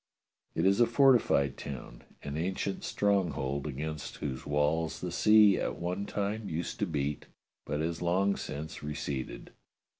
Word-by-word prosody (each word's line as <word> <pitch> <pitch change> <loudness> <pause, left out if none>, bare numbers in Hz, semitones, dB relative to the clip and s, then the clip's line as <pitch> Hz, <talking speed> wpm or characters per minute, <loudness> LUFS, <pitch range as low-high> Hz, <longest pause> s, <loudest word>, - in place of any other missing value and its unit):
It 80 - +1
is 100 +4 +4
a 120 - +6
fortified 115 - +4
town, 65 -3 -7 0.2
an 70 0 -4
ancient 95 +4 -2
stronghold 80 -9 0
against 75 +2 -5
whose 65 -3 -5
walls 75 +3 +1
the 90 - -4
sea 105 +1 +6
at - - -2
one 90 +4 -3
time 105 +1 -2
used 80 +2 -3
to - - +1
beat 70 0 -2 0.4
but 75 +1 -1
has 85 +1 -2
long 95 +3 +2
since 80 +2 -6
receded. 70 -2 -4
80 Hz, 145 wpm, -30 LUFS, 75-100 Hz, 0.4 s, a